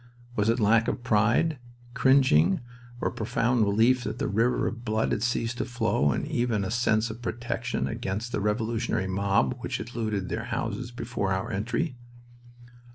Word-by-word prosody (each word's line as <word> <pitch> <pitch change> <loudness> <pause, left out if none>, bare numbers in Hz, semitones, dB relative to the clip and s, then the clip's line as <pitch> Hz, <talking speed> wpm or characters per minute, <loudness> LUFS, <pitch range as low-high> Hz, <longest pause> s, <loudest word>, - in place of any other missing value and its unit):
Was 105 +1 +2
it 115 +2 +2
lack 110 +1 +4
of 120 - -2
pride, 120 +8 +2 0.3
cringing 125 - +4 0.4
or - - 0
a - - -11
profound 120 +1 0
relief 115 +5 +3
that 110 0 -4
the - - -1
river 115 +4 +1
of 120 0 -4
blood 110 -1 0
had - - 0
ceased 120 0 -1
to - - 0
flow 120 - +1
and - - -2
even 120 -4 0
a 95 - -3
sense 115 -1 +1
of 115 +2 -10
protection 120 0 -2
against 115 0 -3
the 105 - -1
revolutionary 110 -1 0
mob 95 -7 +1
which - - -3
had 120 +4 -7
looted 110 -5 -2
their 110 +1 -3
houses 115 0 -3
before 120 -5 -3
our 95 0 -1
entry? 125 - -2
115 Hz, 170 wpm, -27 LUFS, 105-120 Hz, 0.4 s, lack